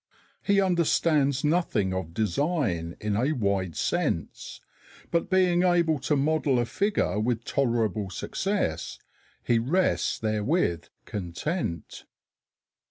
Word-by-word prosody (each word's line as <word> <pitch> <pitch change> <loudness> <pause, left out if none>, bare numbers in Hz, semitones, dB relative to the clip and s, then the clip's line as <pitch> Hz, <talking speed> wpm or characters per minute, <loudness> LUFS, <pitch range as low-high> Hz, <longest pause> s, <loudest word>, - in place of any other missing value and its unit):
He 200 -1 +2
understands 160 -6 +2
nothing 150 - +1
of 95 -3 -4
design 110 - -1
in 105 -1 -1
a 130 +8 +1
wide 100 - -1
sense, - - -2 0.5
but 170 -1 0
being 180 -2 +3
able 170 -4 +2
to 150 - 0
model 145 -1 +1
a 120 - +1
figure 200 - 0
with 115 +1 -1
tolerable 115 -7 0
success 175 - -2 0.5
he 120 -1 +2
rests 170 +11 +1
therewith 110 - 0 0.2
content. 95 - -4
130 Hz, 105 wpm, -27 LUFS, 100-170 Hz, 0.5 s, being